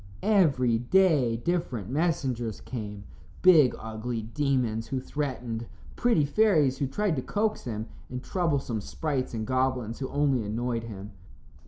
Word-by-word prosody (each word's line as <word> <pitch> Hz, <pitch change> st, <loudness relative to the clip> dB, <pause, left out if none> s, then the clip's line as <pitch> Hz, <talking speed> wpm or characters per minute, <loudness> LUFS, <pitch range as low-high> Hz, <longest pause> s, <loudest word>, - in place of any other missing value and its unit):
Every 140 Hz, -, +3 dB
day 140 Hz, -4 st, +3 dB
different 125 Hz, -, -2 dB
messengers 130 Hz, -, -1 dB
came 105 Hz, -5 st, -6 dB, 0.4 s
big, 160 Hz, -8 st, +7 dB
ugly 110 Hz, +1 st, -4 dB
demons 120 Hz, -3 st, 0 dB
who 135 Hz, -, -2 dB
threatened, 125 Hz, -5 st, -4 dB, 0.3 s
pretty 230 Hz, -12 st, +3 dB
fairies 155 Hz, -7 st, +3 dB
who 140 Hz, -, 0 dB
tried 195 Hz, +5 st, 0 dB
to -, -, 0 dB
coax 215 Hz, -, -1 dB
him, 110 Hz, -3 st, -3 dB, 0.2 s
and 125 Hz, 0 st, -5 dB
troublesome 140 Hz, -, -1 dB
sprites 135 Hz, +1 st, -3 dB
and 110 Hz, -1 st, -3 dB
goblins 130 Hz, -3 st, 0 dB
who 130 Hz, -, -3 dB
only 140 Hz, -5 st, +1 dB
annoyed 115 Hz, +2 st, -2 dB
him. 105 Hz, -2 st, -8 dB
130 Hz, 135 wpm, -28 LUFS, 115-150 Hz, 0.4 s, big